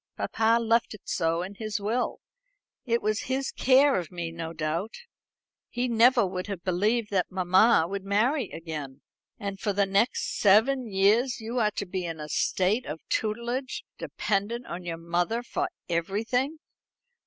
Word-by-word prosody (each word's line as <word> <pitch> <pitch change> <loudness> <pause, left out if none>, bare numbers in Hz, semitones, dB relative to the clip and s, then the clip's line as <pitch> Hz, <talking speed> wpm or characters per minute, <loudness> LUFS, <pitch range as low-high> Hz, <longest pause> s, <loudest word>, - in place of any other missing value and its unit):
"Papa 225 +1 +2
left 230 -1 +1
it 210 - -16
so 165 0 0
in 190 +2 -7
his 215 +1 -4
will. 220 +5 -1 0.6
It 235 -3 0
was 215 0 +1
his 265 +1 -1
care 270 -2 +4
of 175 - -7
me, 170 -2 -4
no 165 -1 -5
doubt. 165 +6 -3 0.7
He 245 +1 -1
never 235 0 +5
would 185 0 -4
have 195 -4 -5
believed 210 +5 0
that 190 -3 +1
mamma 185 +1 +4
would 195 +1 -4
marry 220 +5 +1
again." 150 -5 -7 0.4
"And 200 -2 -5
for 205 -2 -1
the 200 0 +2
next 200 +5 0
seven 225 +5 +4
years 215 +6 +3
you 230 +3 -3
are 215 -2 +3
to 200 - -2
be 185 0 -4
in 165 -2 -5
a 150 0 -7
state 195 - +1
of 155 +2 -7
tutelage, 235 +5 -2 0.2
dependent 220 +4 -2
on 175 +1 -6
your 165 -1 -4
mother 175 +8 -1
for - - -2 0.2
everything?" 225 - -1
205 Hz, 160 wpm, -27 LUFS, 180-235 Hz, 0.7 s, never